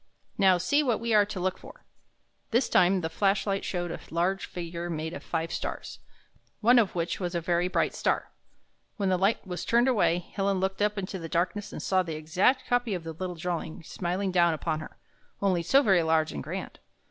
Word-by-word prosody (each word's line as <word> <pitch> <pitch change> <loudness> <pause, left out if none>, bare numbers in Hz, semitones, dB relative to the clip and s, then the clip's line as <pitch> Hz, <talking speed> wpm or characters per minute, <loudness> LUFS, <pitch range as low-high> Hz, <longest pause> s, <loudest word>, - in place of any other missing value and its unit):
Now, 190 -2 +5
see 285 - +2
what 245 -6 +1
we 230 0 -1
are 205 -1 +5
to 205 -3 -5
look 185 +1 -1
for." - - -14 0.6
This 240 +2 +2
time 185 +1 +4
the 160 - -1
flash 195 +4 +1
light 195 -1 -1
showed 175 -2 -3
a - - -5
large 180 +4 0
figure 170 0 -5
made 160 0 -3
of - - -6
five 165 0 -3
stars, - - -5 0.6
one 240 +3 +6
of 215 -5 +1
w^hich 170 -1 -2
was 180 -2 -3
the 175 +1 0
bright - - +1
star. - - -1 0.7
When 200 -3 0
the 185 - +2
light 195 +5 +1
was 180 -2 -5
turned 235 +2 +3
away. 215 -9 +3
Helen 195 +2 -2
looked 190 +1 -2
up 210 0 +1
into 190 -1 -4
the 165 -1 -7
darkness 185 +5 -1
and - - -6
saw 190 -1 +2
the 165 -3 -4
exact 180 - +1
copy 245 -4 +1
of 175 - -5
the 165 0 -6
little 180 +2 -5
di'awing 170 -1 -4
smiling 185 +2 -2
down 170 -2 +3
upon 155 0 -2
her 155 - -10 0.2
— - - -37
only 190 -3 +1
so 270 - +4
very 190 -7 +4
large 160 -1 +2
and 70 - -5
grand. - - -6
185 Hz, 210 wpm, -28 LUFS, 170-200 Hz, 0.7 s, one